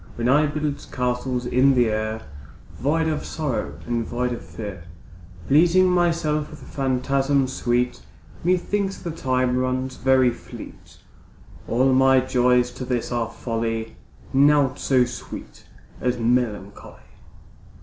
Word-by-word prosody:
When 120 0 -1
I 150 +3 +4
build 150 -1 -3
castles 125 0 -1
in 130 +2 +4
the 120 -2 +3
air, 110 +1 -2 0.6
Void 160 +4 +1
of 155 -2 -1
sorrow 115 - -3
and 115 +2 -1
void 125 +2 -2
of 120 - -7
fear, 100 -6 -8 0.6
Pleasing 170 +6 +5
myself 165 -4 +1
with 150 - -10
phantasms 135 0 0
sweet, 120 - 0 0.4
Methinks 190 +3 0
the 170 - -5
time 130 -4 0
runs 130 0 -1
very 130 -1 +4
fleet. - - -12 0.7
All 130 +3 +3
my 135 0 +5
joys 125 -1 +2
to - - -7
this 125 -2 -2
are 120 -2 -1
folly, 115 -1 -3 0.4
Naught 140 -1 +4
so 130 -2 +3
sweet 120 - -9 0.3
as 125 0 0
melancholy. 115 -4 -1
130 Hz, 125 wpm, -23 LUFS, 120-145 Hz, 0.7 s, Pleasing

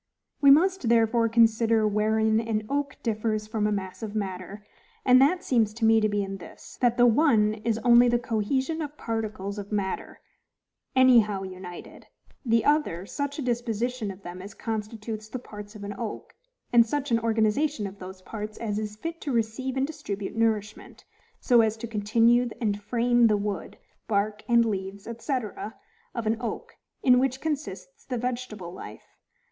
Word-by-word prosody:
We 280 - +7
must 330 -2 +4
therefore 230 0 +3
consider 225 -1 +4
wherein 220 +1 +2
an 220 -2 -2
oak 285 +2 -2
differs 215 -1 -1
from 215 -1 -1
a - - 0
mass 190 -1 -4
of 220 -1 -5
matter, 195 0 -5 0.4
and 255 0 +7
that 350 +7 +3
seems 220 -4 +1
to 225 0 0
me 225 0 +5
to 215 - +2
be 205 -1 0
in 195 0 -5
this, 175 - -13
that 240 -1 +3
the 245 - +6
one 230 -4 +4
is 225 -1 +1
only 240 0 +7
the 240 - +3
cohesion 260 +7 -1
of 300 0 -6
particles 215 -3 -4
of 205 +1 -8
matter 200 -2 -3 0.8
any 260 -2 +7
how 205 -3 -1
united, 185 -1 -9 0.4
the 230 -3 +2
other 290 - +1
such 285 +5 -4
a 295 - -3
disposition 240 -1 -2
of 195 0 -9
them 175 +1 -8
as 195 +1 -10
constitutes 215 0 -5
the 255 - -4
parts 210 -3 -10
of 205 - -9
an 200 0 -5
oak; 230 -3 -6 0.4
and 235 -1 +8
such 285 +2 -2
an 230 - +4
organization 225 +3 +1
of 200 0 -8
those 185 0 -10
parts 215 0 -6
as 210 -2 -2
is 210 -1 -5
fit 330 +9 -6
to 285 - -3
receive 240 +3 -1
and 265 - +2
distribute 215 -11 -5
nourishment, 220 -2 -2 0.3
so 240 -3 +5
as 220 0 +1
to 225 - -6
continue 230 +3 +2
and 205 -3 -1
frame 240 +2 +3
the 210 -1 +3
wood, 200 -3 -4 0.3
bark, 210 0 0
and 235 -1 +4
leaves, 195 -1 -4
&c., 280 - -3 0.8
of 235 -2 -3
an 220 +1 +1
oak, 350 - -5 0.3
in 250 -1 +6
which 260 0 0
consists 320 - -5
the 250 - -4
vegetable 235 -7 -4
life. - - -10
225 Hz, 175 wpm, -26 LUFS, 210-245 Hz, 0.8 s, and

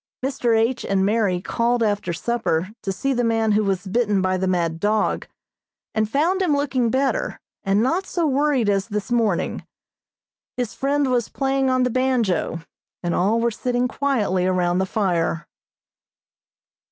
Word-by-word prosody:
Mr. 245 -4 +1
H. 230 +3 +1
and 195 -1 +1
Mary 205 -4 +1
called 235 +5 0
after 205 -4 0
supper 185 -2 -1
to 195 - -2
see 270 +8 -1
the 245 -1 0
man 225 -1 +1
who 210 +1 +3
was 195 -1 -1
bitten 205 0 +1
by 185 0 +1
the 185 0 -1
mad 170 -3 0
dog, 210 +3 0 0.7
and 215 -1 0
found 330 - +1
him 335 -6 +2
looking 270 -4 0
better, 265 +3 0 0.2
and 200 +1 +2
not 335 +10 0
so 340 -2 -1
worried 280 -4 +2
as 200 0 +1
this 210 -1 -4
morning. 225 -7 0 0.9
His 245 -3 -2
friend 280 0 0
was 240 -3 0
playing 270 -1 0
on 255 0 +2
the 250 - +1
banjo, 240 -10 0 0.4
and 175 -1 -1
all 210 +6 +2
were 235 0 +1
sitting 245 +2 -1
quietly 220 -10 0
around 180 -1 +1
the 190 - 0
fire. 175 -5 -1
225 Hz, 160 wpm, -22 LUFS, 190-255 Hz, 0.9 s, who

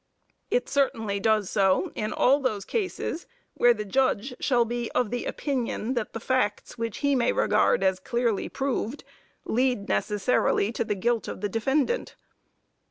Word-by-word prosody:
It - - +1
certainly 225 -7 0
does 215 -1 +1
so 190 -3 +2
in 215 0 -3
all 275 +3 +3
those 215 -8 -2
cases, 375 -5 -3 0.3
where 245 - +5
the 210 -3 -2
judge 255 +2 +1
shall 245 -4 +2
be 240 0 -3
of 245 -4 +1
the 245 - -2
opinion 255 -3 -2
that 235 -4 -3
the 225 - -4
facts 225 -4 -1
which 230 -2 -4
he 285 - +3
may 245 -3 +2
regard - - +2
as 190 -1 +2
clearly 235 +1 -1
proved, 270 -1 -2 0.4
lead 245 -4 0
necessarily 205 - +1
to 230 - -1
the 210 - -2
guilt 235 +4 0
of - - -6
the 205 - -1
defendant. 270 - 0
235 Hz, 160 wpm, -26 LUFS, 210-260 Hz, 0.4 s, where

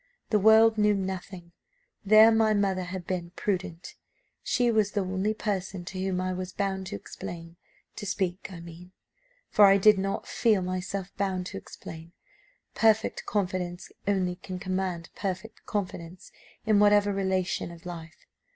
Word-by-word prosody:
The 210 - +4
world 220 +1 +6
knew 210 0 +4
nothing; 185 -2 -5 0.5
there 215 +2 +7
my 220 -1 +3
mother 190 -2 0
had 180 0 -6
been 175 -2 -3
prudent. 185 -3 -3 0.5
She 245 -1 +1
was 215 -2 +1
the 205 - +1
only 190 +3 -1
person 190 -4 -3
to 185 +1 -5
whom 190 -1 -1
I 185 0 -1
was 185 0 -5
bound 190 -1 -2
to - - -5
explain 165 +10 -8 0.4
to 205 - -5
speak, 190 -1 -2
I 170 -2 -8
mean, 170 +2 -12 0.6
for 210 - +7
I 195 0 +6
did 210 0 +6
not 195 +1 -2
feel 215 -5 +2
myself 185 +1 -4
bound 190 -2 -1
to - - -4
explain. 165 -1 -11 0.6
Perfect 220 -1 +2
confidence 185 -3 -2 0.2
only 185 -3 +1
can 185 0 -7
command 185 -3 -3
perfect 195 +3 -5
confidence 180 -4 -5 0.3
in 215 -2 +4
whatever 205 0 +5
relation 190 -3 -1
of 170 0 -13
life. 170 -1 -9
190 Hz, 150 wpm, -28 LUFS, 180-205 Hz, 0.6 s, there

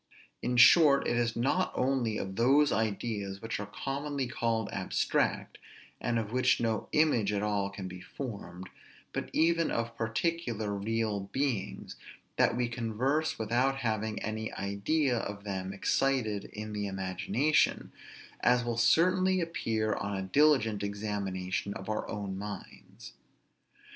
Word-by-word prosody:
In 125 - -1
short, 140 +1 +7
it - - +1
is 120 -1 0
not 140 +10 +1
only 125 -4 +1
of 95 0 -4
those 140 +6 +4
ideas 105 -2 -2
which 110 +1 -4
are 105 - -5
commonly 140 +5 -3
called 115 -3 -1
abstract, 95 -2 -1 0.4
and 120 -1 0
of 110 -2 -2
which 130 +1 +3
no 115 -2 -1
image 135 -10 +3
at 105 0 -1
all 100 -2 0
can 100 -1 -7
be 90 0 -9
formed, 95 -7 -7 0.5
but - - -3
even 165 +1 +2
of 115 0 -2
particular, 115 -2 -1
real 105 -1 -2
beings, 130 -8 -2 0.4
that - - +3
we 125 -1 +1
converse 125 +6 -1
without 120 +5 +1
having 110 -1 -1
any 110 +1 -3
idea 120 +7 0
of 100 -2 -5
them 95 -2 -4
excited 110 0 0
in 105 0 -7
the 105 -1 -2
imagination; 95 - 0 0.5
as 125 0 +3
will 120 -1 -2
certainly 185 +9 +4
appear 110 - -1
on 100 0 -3
a 95 - -3
diligent 115 -1 +3
examination 100 -2 -3
of 95 - -7
our 110 - -2
own 100 -2 -4
minds. 100 -2 -9
110 Hz, 140 wpm, -30 LUFS, 100-130 Hz, 0.5 s, short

